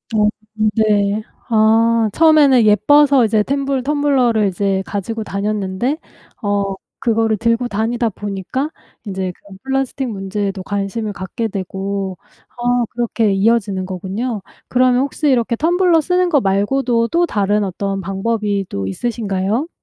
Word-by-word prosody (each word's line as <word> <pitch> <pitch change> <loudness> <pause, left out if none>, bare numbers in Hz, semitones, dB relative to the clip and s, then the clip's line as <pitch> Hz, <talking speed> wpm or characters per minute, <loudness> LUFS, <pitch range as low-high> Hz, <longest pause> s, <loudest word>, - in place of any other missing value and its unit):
어 210 -1 +4 0.5
네. 210 -1 +2 0.3
아 225 0 +4
처음에는 300 -6 +5
예뻐서 270 +5 +5
이제 215 -1 +2
템블 275 0 -1
텀블러를 265 -7 +2
이제 195 +1 0
가지고 220 +3 -4
다녔는데 205 +5 -2 0.4
어 200 -2 -1 0.2
그거를 225 -2 +1
들고 230 +2 +1
다니다 230 +2 -1
보니까 205 - -4 0.4
이제 190 -2 -3
그 200 -1 -15
플라스틱 270 0 -1
문제에도 195 -1 -3
관심을 205 +2 -3
갖게 190 +5 -4
되고. 195 -1 -4 0.4
아 245 0 +2
그렇게 230 -3 0
이어지는 195 -2 +1
거군요. 195 +5 -4 0.3
그러면 255 0 +3
혹시 290 +2 -1
이렇게 240 -2 +2
텀블러 345 +3 +3
쓰는 360 +3 +1
거 290 -5 +3
말고도 230 +4 +1
또 340 +6 +2
다른 205 - 0
어떤 195 +1 -3
방법이 200 +1 -1
또 100 -1 -3
있으신가요? 215 - -2
220 Hz, 300 characters per minute, -18 LUFS, 200-250 Hz, 0.5 s, 처음에는